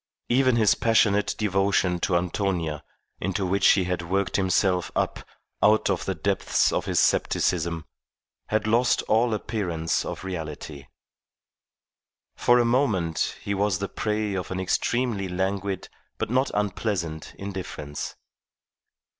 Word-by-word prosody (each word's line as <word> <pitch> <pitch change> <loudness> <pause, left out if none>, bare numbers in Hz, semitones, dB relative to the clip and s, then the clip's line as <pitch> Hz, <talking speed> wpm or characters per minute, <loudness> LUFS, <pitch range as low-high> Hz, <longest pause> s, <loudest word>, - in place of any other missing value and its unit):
Even 130 0 +4
his 110 -3 +5
passionate 105 -3 +2
devotion 95 -3 +1
to 90 0 0
Antonia 85 -4 -2 0.4
into 95 +1 -1
which 95 +2 +3
he 95 - +5
had 90 -1 -2
worked 95 +3 -1
himself 95 -2 +1
up - - 0 0.4
out 105 -1 +4
of 90 - -2
the 95 - -1
depths 95 +5 +1
of - - -1
his - - +1
scepticism 85 -2 +1 0.6
had 110 0 0
lost 120 +3 +2
all 115 +2 +2
appearance 95 -7 -1
of - - -6
reality. 75 -5 -6 1.5
For 120 - +4
a 120 - +3
moment 110 - +1
he 100 - -2
was 100 -2 +1
the 100 +1 -4
prey 105 -1 -1
of 95 -2 -3
an 95 - -3
extremely 105 +2 0
languid 95 +1 -2 0.3
but - - -3
not 130 +2 +2
unpleasant 95 -6 -2
indifference. 95 -7 -6
95 Hz, 130 wpm, -25 LUFS, 90-105 Hz, 1.5 s, his